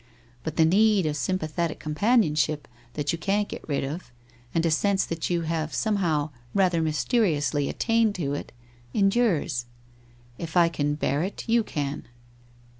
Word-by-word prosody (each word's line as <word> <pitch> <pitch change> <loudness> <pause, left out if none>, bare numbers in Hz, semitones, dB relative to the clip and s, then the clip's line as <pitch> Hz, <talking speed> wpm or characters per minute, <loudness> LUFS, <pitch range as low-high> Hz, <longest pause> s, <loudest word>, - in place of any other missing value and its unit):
But 160 -1 -4
the 160 - +5
need 205 +2 +4
of 150 -1 0
sympathetic 165 0 -1
companionship 155 - +1 0.3
that 145 -1 0
you 170 - -3
can't 200 +5 +1
get - - -8
rid 140 - 0
of, 145 +1 -5 0.4
and 165 0 +1
a 165 - +2
sense 195 +5 +2
that 165 -1 -3
you 175 -1 +1
have 160 -1 -2
somehow 170 -9 0 0.2
rather 180 -4 +3
mysteriously 155 - +1
attained 225 -2 +1
to 145 -6 -2
it, 145 - -5 0.4
endures. 195 - +2 0.7
If 165 +1 -3
I 170 -1 +6
can 145 -3 -1
bear 145 -1 0
it, 190 +7 -4
you 230 0 +3
can. 145 -7 -4
165 Hz, 150 wpm, -26 LUFS, 150-200 Hz, 0.7 s, I